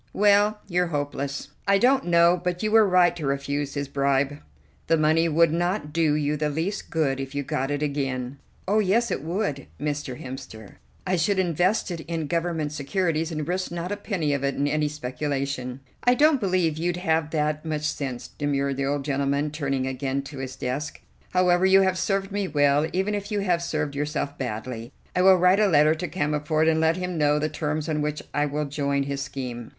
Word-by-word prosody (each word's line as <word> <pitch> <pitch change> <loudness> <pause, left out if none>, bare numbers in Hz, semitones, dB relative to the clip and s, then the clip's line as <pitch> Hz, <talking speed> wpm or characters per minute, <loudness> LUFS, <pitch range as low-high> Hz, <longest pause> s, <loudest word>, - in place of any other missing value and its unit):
"Well, 205 +1 +4
you're 180 -1 +1
hopeless! 145 -2 -3 0.2
I 200 0 +5
don't 260 +3 +3
know 170 0 +4
but 180 +2 -2
you 215 - 0
were 220 -1 +6
right 180 -2 +4
to 155 -5 -4
refuse 140 +1 -2
his 140 -1 -2
bribe. 140 +1 0 0.5
The 165 - +4
money 160 +2 +3
would 165 +1 +4
not 175 -2 -1
do 160 -2 +2
you 150 0 0
the 150 0 0
least 165 +7 -3
good 140 -5 0
if 135 +1 -6
you 145 - -1
got 135 0 -2
it 145 +1 -1
again." 135 -2 -2 0.3
"Oh, 210 +3 +3
yes, 220 +4 +2
it - - -1
would, 165 -4 -2
Mr. 145 -3 -3
Hemster. 110 -5 -9 0.3
I 185 -1 +1
should 200 +4 +1
invest 180 +3 +1
it 170 - -4
in 165 -2 -2
Government 165 -1 -1
securities, 160 +2 -1
and 155 -2 -3
risk 185 +1 -1
not 175 +2 -4
a - - 0
penny 185 -8 -2
of 140 -1 -2
it 140 -1 0
in 145 - 0
any 150 0 +1
speculation." 135 -2 -3 0.2
"I 245 0 +4
don't 295 0 +4
believe 180 -5 +1
you'd 175 +1 -1
have 160 -3 0
that 150 -1 -1
much 155 -2 -3
sense," 135 -5 -3
demurred 140 -2 -1
the 135 0 -1
old 140 -1 -1
gentleman, 140 +1 0
turning 135 -3 -1
again 130 +1 -2
to 140 0 -9
his 130 -1 -5
desk. 145 +4 -4 0.3
"However, 180 0 +3
you 190 +1 +6
have 190 -1 +2
served 195 0 -1
me 200 -1 -1
well, 145 0 +3
even 190 +3 0
if 205 +1 -4
you 205 -1 0
have 175 -3 +1
served 155 -4 -2
yourself 145 0 -2
badly. 120 -1 -5 0.2
I 180 - +3
will 190 0 +7
write 180 +3 +4
a 210 - +4
letter 155 -3 +5
to 160 +3 -4
Cammerford 150 -1 0
and 160 0 +3
let 160 +2 +2
him 180 -2 -3
know 150 0 +3
the 155 +1 0
terms 155 0 -2
on 155 -2 -1
which 150 0 -2
I 145 0 +1
will 150 +1 -2
join 140 -1 -1
his 140 0 -3
scheme." 125 -4 -6
150 Hz, 205 wpm, -25 LUFS, 140-180 Hz, 0.5 s, will